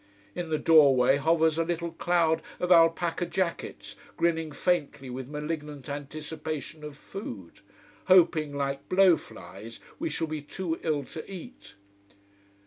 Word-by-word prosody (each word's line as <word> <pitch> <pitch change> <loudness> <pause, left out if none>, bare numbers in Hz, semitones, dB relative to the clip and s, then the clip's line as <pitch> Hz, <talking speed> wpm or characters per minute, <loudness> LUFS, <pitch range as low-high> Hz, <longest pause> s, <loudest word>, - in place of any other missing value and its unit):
In 175 -2 -4
the 155 - +1
doorway 140 -5 +5
hovers 160 +1 +2
a - - +3
little 170 0 -3
cloud 165 -1 +1 0.2
of 180 0 -1
alpaca 165 0 +4
jackets 175 -1 -3 0.2
grinning 165 -2 0
faintly 145 -5 -1
with 130 0 -6
malignant 150 -1 -5
anticipation 150 +1 -6
of 150 -1 -8
food, 105 - -9 0.5
hoping, 170 -5 +4
like 140 -1 -3
blow 185 -2 +6
flies, 115 -6 -11 0.2
we 330 +2 -1
shall 165 - -2
be 155 -1 -5
too 165 +3 -4
ill 150 -3 0
to 155 +7 -9
eat. 220 +8 -10
160 Hz, 135 wpm, -28 LUFS, 145-170 Hz, 0.5 s, blow